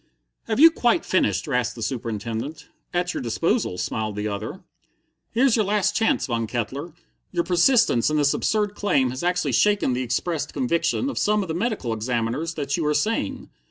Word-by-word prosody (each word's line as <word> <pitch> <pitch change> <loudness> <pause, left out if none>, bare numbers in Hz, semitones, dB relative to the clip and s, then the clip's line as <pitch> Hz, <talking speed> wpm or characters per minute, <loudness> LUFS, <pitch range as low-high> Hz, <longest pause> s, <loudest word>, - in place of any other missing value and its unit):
"Have 220 +2 -1
you 325 +2 +9
quite 280 +2 +1
finished?" 100 - +1
rasped 125 -1 -1
the 115 - -5
Superintendent. 115 +4 -4 0.2
"At 175 0 -1
your - - -3
disposal," 145 - 0
smiled 110 +2 -3
the 105 +1 -2
other. 105 - -5 0.7
"Here's 245 +1 +3
your 220 -3 +2
last 210 0 +1
chance, 225 - +2
Von 115 -4 -2
Kettler. 130 +8 -4 0.4
Your 175 -1 0
persistence 180 - +3
in 155 - 0
this 145 -1 +3
absurd 210 -2 0
claim 145 -12 +1
has 130 - -5
actually 180 -5 0
shaken 200 - +2
the 125 - -1
expressed 140 +6 -2
conviction 155 - 0
of 280 - -2
some 210 0 +2
of 185 - -8
the - - -1
medical 185 - -1
examiners 120 +8 -2
that 140 -1 -2
you 165 - -1
are 150 - +1
sane. 215 +10 -1
150 Hz, 180 wpm, -24 LUFS, -, 0.7 s, you